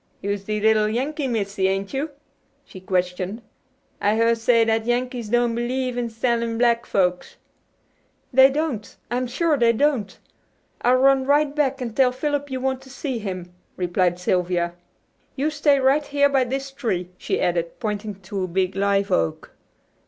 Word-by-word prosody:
"You'se 200 0 -3
the 215 0 -1
little 215 0 +3
Yankee 275 +5 -2
missy, 200 -5 -1
ain't 195 +3 -2
you?" 280 +4 -2 0.6
she 185 - -11
questioned. 185 +3 -2 0.6
"I 205 +1 +2
hear 230 +1 +3
say 230 0 +3
that 225 0 0
Yankees 245 -2 -1
don't 240 0 +2
believe 250 +2 -2
in 240 -1 -2
selling 230 0 -1
black 235 0 +2
folks." 180 -2 0 1.0
"They 265 +1 +8
don't; 275 -7 -3
I'm 250 +1 0
sure 300 +5 +1
they 230 -1 +4
don't. 260 -4 0 0.6
I'll 250 +1 +4
run 265 0 +4
right 290 +1 +2
back 275 -3 0
and 235 -3 -4
tell 260 -2 +4
Philip 285 +2 -2
you 260 -1 -3
want 265 0 -1
to 265 - -15
see 265 -2 -4
him," 185 -4 -6 0.2
replied 180 0 +1
Sylvia. 180 -1 0 0.6
"You 290 +3 0
stay 290 -2 +3
right 270 +3 +3
here 285 0 +3
by 270 -2 +2
this 270 +2 -4
tree," 195 -10 -3
she - - -1
added, 170 -1 -1
pointing 210 -2 -3
to 190 +1 -4
a - - -6
big 185 +1 -1
live 200 0 +1
oak. 80 -1 -1
235 Hz, 165 wpm, -23 LUFS, 195-265 Hz, 1.0 s, They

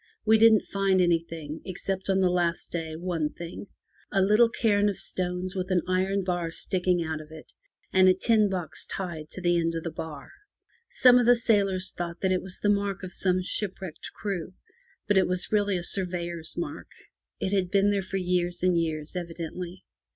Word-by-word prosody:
We 220 0 +5
didn't 220 -2 +6
find 195 -1 +1
anything, 165 -3 -1
except 190 +1 -4
on 190 0 +3
the 185 -1 +3
last 175 -2 -1
day 160 -2 -4
one 165 -2 -2
thing— 170 +4 -8 0.4
a 195 - +2
little 210 +5 +5
cairn 210 -3 +2
of 200 - -4
stones 180 0 -3
with 185 0 -3
an 180 -3 +2
iron 190 +2 +1
bar 175 -2 -1
sticking 180 0 0
out 160 -1 -3
of 155 - -12
it, 155 0 -12 0.4
and 185 0 +6
a 185 - +5
tin 215 +1 +3
box 175 -5 -3
tied 170 -5 -5
to 185 - -8
the 175 -1 +2
end 165 0 0
of 165 - -3
the 165 - -4
bar. 155 -3 -7 0.6
Some 250 -1 +6
of 240 - +2
the 245 - +7
sailors 200 -5 +1
thought 170 0 -4
that 190 - +1
it 185 - +1
was 190 -1 -5
the - - -1
mark 200 -2 0
of 185 - -6
some 185 -1 +1
shipwrecked 190 -3 -4
crew, 185 -3 -4 0.5
but 205 -2 +4
it 190 - +2
was 180 0 -2
really 205 -2 +2
a 175 - -4
sur 190 +2 +1
veyor's 170 -2 -5
mark. 310 -3 -5 0.5
It 190 - -1
had 190 -3 +1
been 200 +2 +3
there 200 -1 +1
for 195 +1 -4
years 180 -1 -1
and 180 -1 +3
years 155 0 -4
evidently. 175 +1 -6
185 Hz, 195 wpm, -27 LUFS, 170-195 Hz, 0.6 s, the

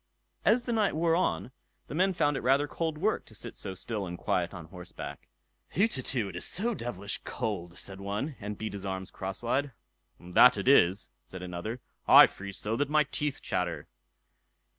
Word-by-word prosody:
As 235 +3 +4
the 240 - -2
night 215 -7 +2
wore 165 +1 +3
on, 175 -7 0 0.3
the - - -8
men 185 +5 +3
found 150 -5 +1
it - - -1
rather 135 +4 +3
cold 160 +2 -2
work 210 +7 0
to 110 - -15
sit - - -6
so 95 -2 -6
still 105 0 -4
and 85 0 -6
quiet 85 0 0
on 85 -4 -8
horseback. 85 -4 -9 0.5
"Hutetu! 130 - +1
it 90 - -9
is 85 - -3
so 230 +6 +1
devilish 105 - -4
cold", 90 -5 -4
said 95 0 -7
one, 105 +9 -3
and 105 0 -5
beat 110 -1 -4
his 100 -1 -6
arms 95 -1 -4
crosswise. 120 +9 -2 0.5
"That 90 +8 +6
it - - -3
is", 100 -8 +5 0.2
said 95 -1 -9
another; 90 +7 -5 0.3
"I - - +11
freeze 100 0 -7
so, 110 +2 -1
that 145 0 0
my 150 0 +4
teeth 145 0 -3
chatter." 85 -5 -2
110 Hz, 185 wpm, -29 LUFS, 95-150 Hz, 0.5 s, I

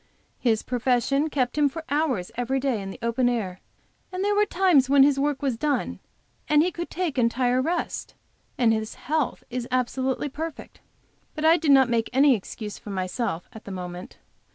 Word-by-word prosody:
His 225 -3 +1
profession 255 +4 +1
kept 260 -1 -1
him 290 -1 +4
for 325 +3 -7
hours 270 - 0
every 245 +3 -1
day 260 -6 -1
in 195 - -6
the - - -8
open 240 +2 +2
air; 195 -7 -2 0.5
there 385 +3 0
were 415 0 +3
times 345 -8 +3
when 280 -1 +7
his 275 -1 +3
work 290 0 0
was 260 -5 0
done 290 0 -1 0.5
and 300 0 +5
he 360 - 0
could 345 0 -5
take 335 -7 -2
entire 245 +2 +2
rest; 340 +6 -3 0.4
and 235 -3 +4
his 220 0 -3
health 300 0 -2
is 245 -1 -3
absolutely 255 +2 -1
perfect. 315 +3 -7 0.6
But 310 0 -2
I 325 +1 +7
did 325 -3 -1
not 270 -2 +7
make 230 -2 0
any 275 +1 +6
excuse 210 0 -5
for - - -11
myself 185 -1 -3
at 220 - -12
the 200 - -7
moment. 180 -1 -7
260 Hz, 180 wpm, -25 LUFS, 230-295 Hz, 0.6 s, when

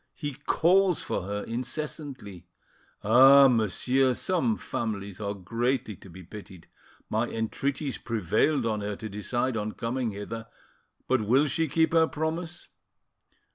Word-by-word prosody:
He 145 -3 -4
calls 185 +1 +3
for - - -2
her 105 0 -3
incessantly. 125 - -6 0.6
Ah! 135 +5 +8
monsieur, 125 +3 +2
some 185 - 0
families 100 -3 -4
are 100 0 -3
greatly 115 +4 -2
to 95 - -14
be 90 +2 -11
pitied! 95 -1 -12 0.4
My - - 0
entreaties 135 +5 -3
prevailed 115 - 0
on 110 -2 -1
her 100 0 -3
to 110 - -7
decide 120 +5 -2
on 105 -1 -3
coming 120 +1 -2
hither, 115 +3 -6 0.6
but 130 -2 +2
will 125 +8 +3
she 160 +3 0
keep 160 +3 +1
her 165 -1 +5
promise? 160 +3 -4
120 Hz, 135 wpm, -27 LUFS, 105-145 Hz, 0.6 s, Ah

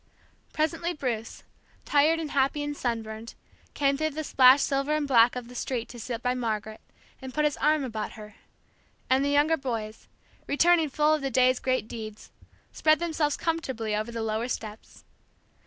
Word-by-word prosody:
Presently 330 +3 -1
Bruce, 240 -7 -4 0.4
tired 295 +3 +3
and 310 -3 -4
happy 275 +2 +1
and 290 0 -4
sunburned, 225 -2 -4 0.4
came 275 -1 +2
through 310 +1 0
the 310 +1 -5
splashed 265 -1 +6
silver 275 +2 0
and 300 -2 -1
black 240 -2 +5
of 250 -1 -6
the 245 - -12
street 245 -1 -3
to 240 - -10
sit 235 +1 -5
by 250 0 +1
Margaret, 220 -3 -3 0.4
and 260 -1 -8
put 300 0 +2
his 295 - +1
arm 300 0 +2
about 220 -4 -4
her; 215 -1 -11 0.8
and 265 +1 +4
the 285 - +1
younger 295 +3 +3
boys, 225 -6 -5 0.4
returning 325 +1 +3
full 300 +2 +2
of 310 - 0
the 270 - -1
day's 255 0 +3
great 255 -4 -1
deeds, 215 -2 -8 0.4
spread 310 0 +3
themselves 320 -3 -1
comfortably 260 -10 -2
over 215 +2 -3
the 230 -1 -4
lower 220 +2 -1
steps. 215 -3 -7
260 Hz, 170 wpm, -27 LUFS, 230-300 Hz, 0.8 s, splashed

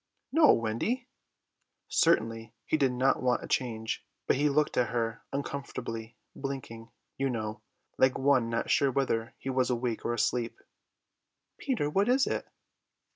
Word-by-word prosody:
"No, 310 0 +7
Wendy." 115 - -1 0.8
Certainly 115 -7 +1
he - - +1
did 140 -4 +3
not 130 +2 +2
want 125 -1 +1
a - - -6
change, 110 -4 -1 0.2
but - - +3
he 145 +2 +2
looked 150 +1 +1
at 120 -3 +2
her 115 -1 -2
uncomfortably, 120 -5 -5 0.2
blinking, 130 -5 -6 0.3
you 135 0 +1
know, 110 -3 -3 0.4
like 130 0 +4
one 130 -4 +3
not 115 0 -1
sure 140 - +4
whether 120 -4 -1
he 135 - -4
was 130 -1 +1
awake 120 -2 -1
or 120 - 0
asleep. 120 0 0 1.0
"Peter, 245 - 0
what 195 +9 +2
is 260 +2 +4
it?" - - -2
125 Hz, 145 wpm, -30 LUFS, 115-140 Hz, 1.0 s, No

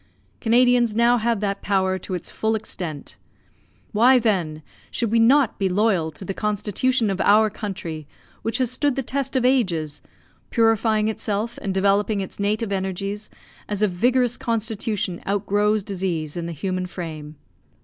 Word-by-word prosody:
Canadians 240 -1 +3
now 235 +1 +4
have 230 -1 0
that 200 -1 -2
power 190 -1 +1
to 185 - -5
its 175 - -6
full 220 0 0
extent. 175 -8 -6 0.7
Why, 245 +4 +5
then, 175 -10 0 0.3
should 230 -3 -1
we 230 - +4
not 255 +2 +4
be 195 -1 +1
loyal 190 -4 +2
to 190 - -10
the 195 - -3
constitution 210 +3 0
of 190 - -2
our 215 +1 +5
country 175 -8 -6 0.3
which 225 0 -1
has 255 -3 0
stood 285 +1 +1
the 270 - -1
test 270 +2 -2
of 255 -1 +2
ages, 180 - +1 0.5
purifying 225 -2 +2
itself 220 +1 -2
and 195 - -2
developing 200 +2 +2
its 190 0 -6
native 210 +1 0
energies 195 +2 -3 0.4
as 205 0 -1
a - - +5
vigorous 245 +6 +1
constitution 220 -6 -2
outgrows 205 +1 +1
disease 180 -6 -3
in 170 -1 -3
the - - -4
human 185 +3 -3
frame. 155 -4 -7
210 Hz, 155 wpm, -23 LUFS, 190-230 Hz, 0.7 s, Why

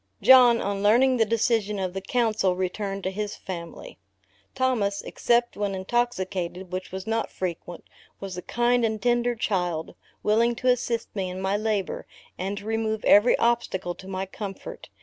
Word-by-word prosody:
John, 245 0 +7
on 200 0 -2
learning 250 +5 +4
the 225 - +4
decision 225 -2 +1
of 185 -2 -2
the 195 - -4
council, 215 -4 +1
returned 195 +2 -3
to 190 - -1
his 210 +1 -4
family. 170 -3 -8 0.6
Thomas 215 -6 0
(except 240 0 +1
when 205 -1 -2
intoxicated, 190 -4 -2
which 185 0 -4
was 190 0 -6
not 225 +1 -1
frequent,) 175 -1 -5 0.4
was 195 -2 -6
a 180 - -5
kind 240 +4 +1
and 220 -1 0
tender 240 +1 +1
child, 180 -7 -2 0.3
willing 230 +3 +3
to 255 +2 0
assist 240 -2 -1
me 190 -2 -2
in 180 +1 -6
my 190 +1 0
labor, 210 -2 -2 0.3
and 195 +2 -4
to 200 - -8
remove 220 -1 -2
every 210 +4 +6
obstacle 230 -7 0
to 190 - -13
my 190 0 -3
comfort. 195 0 -8
205 Hz, 165 wpm, -25 LUFS, 190-235 Hz, 0.6 s, John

